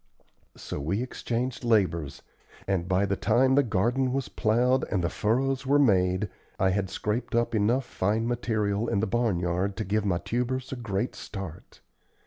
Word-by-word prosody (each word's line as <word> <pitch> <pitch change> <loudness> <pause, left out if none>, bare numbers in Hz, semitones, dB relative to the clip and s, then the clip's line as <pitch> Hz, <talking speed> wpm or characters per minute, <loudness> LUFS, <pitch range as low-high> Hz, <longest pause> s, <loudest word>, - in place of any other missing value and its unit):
So - - -6
we 95 - -1
exchanged 125 0 -3
labors, 90 - +1 0.4
and 95 -3 0
by 95 +2 +2
the 100 0 0
time 125 +6 +3
the 140 - +6
garden 125 +3 +1
was 135 -1 -2
plowed 125 +4 +2
and 90 -3 0
the 85 - 0
furrows 130 +5 0
were 140 +2 +4
made 95 -6 +3 0.3
I 95 0 +3
had 95 0 -1
scraped 105 +5 -2
up 120 0 +1
enough 115 +5 +2
fine 110 +2 0
material 110 -3 0
in 100 - +1
the 110 - +1
barnyard 95 -4 0
to 110 - -2
give 105 +3 0
my 95 -4 +1
tubers 125 +6 -2
a - - -2
great 120 -1 -2
start. 95 -5 -8
110 Hz, 165 wpm, -27 LUFS, 95-120 Hz, 0.4 s, the